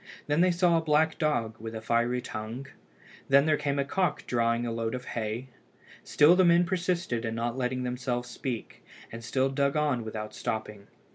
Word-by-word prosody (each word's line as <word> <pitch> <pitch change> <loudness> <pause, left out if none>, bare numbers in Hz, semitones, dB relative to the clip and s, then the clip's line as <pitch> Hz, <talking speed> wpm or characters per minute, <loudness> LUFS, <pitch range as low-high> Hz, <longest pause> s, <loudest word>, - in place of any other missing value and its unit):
Then 150 +3 +2
they 185 - +5
saw 175 -1 +3
a - - +1
black 155 +1 +2
dog 120 -8 0
with 115 +1 -7
a - - -3
fiery 120 +2 +1
tongue. 110 +5 -6 0.6
Then 140 +1 +6
there 155 -1 +3
came 140 -1 -1
a 140 - +1
cock 180 +1 -1
drawing 115 0 +1
a 120 - -2
load 115 +1 -2
of 125 0 -7
hay. 115 +3 -4 0.5
Still 150 +4 +5
the 185 - +5
men 170 0 +5
persisted 175 -8 -1
in 115 -1 -3
not 115 +1 -2
letting 125 0 -1
themselves 125 0 -2
speak, 120 -1 -6 0.3
and 115 +1 -8
still 130 +4 +1
dug 140 +1 0
on 145 -6 +1
without 110 -1 -6
stopping. 105 -2 -4
125 Hz, 190 wpm, -28 LUFS, 115-150 Hz, 0.6 s, Then